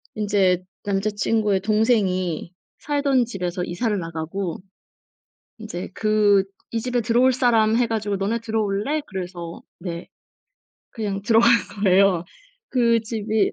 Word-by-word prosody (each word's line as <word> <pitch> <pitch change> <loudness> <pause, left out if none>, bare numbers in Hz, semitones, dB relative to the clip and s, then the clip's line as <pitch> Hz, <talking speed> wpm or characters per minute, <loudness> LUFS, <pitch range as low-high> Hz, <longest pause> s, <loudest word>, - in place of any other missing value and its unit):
인제 195 -4 +2 0.2
남자친구의 205 0 +1
동생이 195 -6 +1 0.3
살던 280 -4 +1
집에서 180 -4 -3
이사를 205 +5 -1
나가고 165 +2 -4 1.0
이제 210 -5 -6
그 210 -2 +3 0.3
"이 225 -1 -1
집에 250 0 0
들어올 240 +3 +3
사람." 230 -3 +3
해 245 - +2
가지고 210 -3 -1
"너네 205 +4 -1
들어올래?" 220 +5 -1
그래서 175 -3 -6 0.2
"네." 170 -1 -6 0.8
그냥 200 -3 -3
들어간 225 +2 +5 0.4
거예요. 185 -2 +4 0.4
그 235 -3 +3
집이 220 -2 -1
210 Hz, 255 characters per minute, -23 LUFS, 185-230 Hz, 1.0 s, 들어간